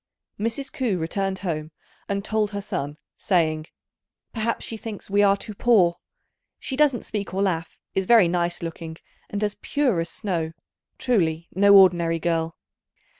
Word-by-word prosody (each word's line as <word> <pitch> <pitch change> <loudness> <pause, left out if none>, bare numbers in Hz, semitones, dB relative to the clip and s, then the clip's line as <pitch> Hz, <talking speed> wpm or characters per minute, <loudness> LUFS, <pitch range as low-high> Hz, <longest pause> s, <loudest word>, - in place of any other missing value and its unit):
Mrs. 230 +6 -2
Ku 235 -8 0
returned 190 +4 -2
home 155 -3 -2 0.4
and 200 0 -2
told 215 -1 +1
her 205 0 -4
son, 145 -6 -4 0.2
saying, 160 -4 +1 0.7
"Perhaps 230 0 -1
she 225 - -5
thinks 215 -2 -8
we 205 +1 +4
are 200 -1 +5
too 215 - -7
poor. 195 -6 +3 0.6
She 265 - -4
doesn't 280 -4 +2
speak 200 -3 -4
or 195 - +1
laugh, 170 -4 -2 0.2
is 190 -1 -1
very 225 -6 +7
nice 175 0 -1
looking, 165 -1 -6 0.3
and 205 +1 -3
as 205 -1 -1
pure 265 -11 +1
as 165 0 -2
snow; 170 -6 -2 0.4
truly 170 -9 0
no 200 +2 +6
ordinary 170 -3 +5
girl." 165 0 -1
195 Hz, 155 wpm, -24 LUFS, 165-215 Hz, 0.7 s, very